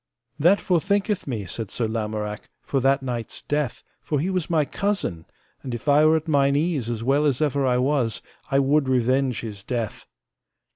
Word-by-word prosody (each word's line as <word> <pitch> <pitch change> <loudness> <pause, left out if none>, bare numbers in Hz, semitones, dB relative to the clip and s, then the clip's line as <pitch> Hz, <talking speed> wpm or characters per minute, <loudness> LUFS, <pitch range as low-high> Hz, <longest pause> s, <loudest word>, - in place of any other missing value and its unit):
That 175 +7 +5
forthinketh 200 +2 0
me, 110 -7 -3
said 110 +4 -5
Sir 115 +3 -1
Lamorak, 105 -1 -4
for 135 - 0
that 135 +1 +2
knight's 120 -3 -5
death, 145 -4 -2 0.2
for 150 - -1
he 180 +6 -1
was 185 -4 -1
my 160 -3 +2
cousin; 195 - -2 0.4
and 125 -3 -4
if 120 - -9
I 150 +2 +6
were 160 +1 +5
at 160 +1 -6
mine 140 -2 +3
ease 145 -6 0
as 115 -1 -3
well 140 +4 +2
as 135 -4 +1
ever 145 -3 +1
I 125 -1 +3
was, 125 -4 0 0.3
I 135 - +2
would 140 0 +3
revenge 130 0 +1
his 105 -4 -7
death. 115 -3 -4
135 Hz, 185 wpm, -24 LUFS, 115-150 Hz, 0.4 s, I